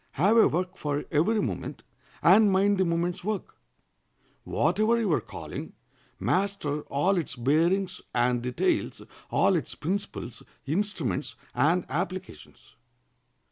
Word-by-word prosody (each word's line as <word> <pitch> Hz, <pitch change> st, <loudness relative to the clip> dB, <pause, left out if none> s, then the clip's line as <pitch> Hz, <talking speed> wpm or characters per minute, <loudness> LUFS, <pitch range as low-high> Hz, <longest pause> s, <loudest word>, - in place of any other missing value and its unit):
Have 195 Hz, +10 st, +3 dB
a 230 Hz, -, +7 dB
work 180 Hz, +3 st, -2 dB
for 145 Hz, -1 st, -2 dB
every 180 Hz, +9 st, +2 dB
moment, -, -, -4 dB, 0.4 s
and 215 Hz, -2 st, +6 dB
mind 195 Hz, +1 st, +3 dB
the 190 Hz, -, +3 dB
moment's 170 Hz, +1 st, -1 dB
work. 210 Hz, 0 st, -3 dB, 0.9 s
Whatever 225 Hz, +2 st, +2 dB
your 190 Hz, -10 st, +1 dB
calling, -, -, -8 dB, 0.5 s
master 185 Hz, -7 st, 0 dB
all 180 Hz, +7 st, +2 dB
its 155 Hz, -, -4 dB
bearings 170 Hz, +9 st, +1 dB
and 120 Hz, 0 st, +1 dB
details, 125 Hz, 0 st, -1 dB, 0.3 s
all -, -, +3 dB
its -, -, -3 dB
principles, 180 Hz, -, -4 dB, 0.2 s
instruments, 165 Hz, -3 st, -2 dB, 0.2 s
and 170 Hz, +4 st, +2 dB
applications. 185 Hz, +6 st, -6 dB
180 Hz, 115 wpm, -27 LUFS, 145-200 Hz, 0.9 s, a